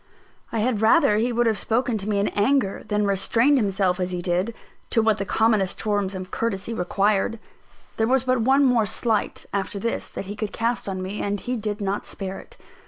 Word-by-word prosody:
I 225 - -1
had 225 -2 0
rather 225 -1 +5
he 235 +3 +1
would 240 0 +1
have 220 -3 +2
spoken 245 +1 0
to 200 +2 -4
me 205 - +1
in 200 - +1
anger 205 -1 +1
than 210 -1 +1
restrained 230 +8 +3
himself 195 -3 +1
as 180 0 -1
he 180 -1 -3
did, 180 +6 -1 0.3
to - - +2
what 220 -2 +2
the 200 - -2
commonest 215 -3 +1
forms 205 -2 -1
of 185 -1 -7
courtesy 225 -1 -2
required. 200 +3 +1 0.6
There 220 - +2
was 260 0 +3
but 255 -2 +1
one 270 +4 +4
more 240 -4 +3
slight, 220 0 -1
after 200 0 -2
this, 230 +4 -2
that - - -7
he 205 +2 -6
could 210 -1 -4
cast 230 -2 -1
on 185 -1 -3
me; 195 +3 -4
and 205 0 -1
he 250 +5 -3
did 210 -2 -3
not 200 +1 -2
spare 195 -1 -5
it. - - -15
210 Hz, 210 wpm, -24 LUFS, 195-230 Hz, 0.6 s, rather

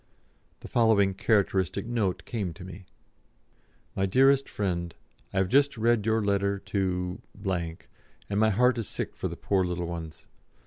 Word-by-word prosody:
The - - -8
following 110 -5 +3
characteristic 100 -2 +1
note 110 -6 -1
came 100 -8 -3
to 90 - -10
me: 95 0 -10 1.1
"MY 95 0 +1
DEAREST 135 +6 +4
FRIEND, 85 -4 -2 0.4
I - - -5
have 95 -1 +3
just 140 +5 +3
read 115 -1 +2
your 110 -1 +2
letter 100 0 +1
to 90 -2 -2 0.3
and 90 +3 -5
my 110 0 +4
heart 120 +3 +3
is 115 - -3
sick - - -4
for - - -3
the - - -7
poor 95 -2 +1
little 90 -1 -2
ones! 85 -2 -7
100 Hz, 150 wpm, -28 LUFS, 90-110 Hz, 1.1 s, DEAREST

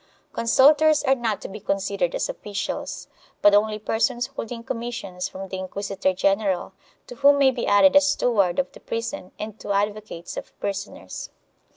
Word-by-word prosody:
Consul 265 +5 +5
tors 310 0 +3
are 265 -2 +4
not 230 -5 -1
to - - -6
be 205 +2 -8
considered 195 -3 -1
as - - -1
officials, 200 -2 -5 0.4
but 205 - +7
only 215 +1 +3
persons 230 +3 0
holding 230 +1 -5
com 230 0 -4
missions 195 -6 -5
from 195 +1 -7
the 190 - -4
inquisitor 195 0 -2
general, 195 0 0 0.3
to - - -10
whom 285 0 +6
may 275 -1 +5
be 245 -2 -3
added 280 +8 +5
a 285 - +9
steward 230 -10 +2
of 275 - 0
the - - -14
prison 230 -3 -5
and 215 0 -7
two - - -5
advocates 205 -3 -2
of - - -9
prisoners. 200 0 -5
215 Hz, 175 wpm, -24 LUFS, 195-245 Hz, 0.4 s, a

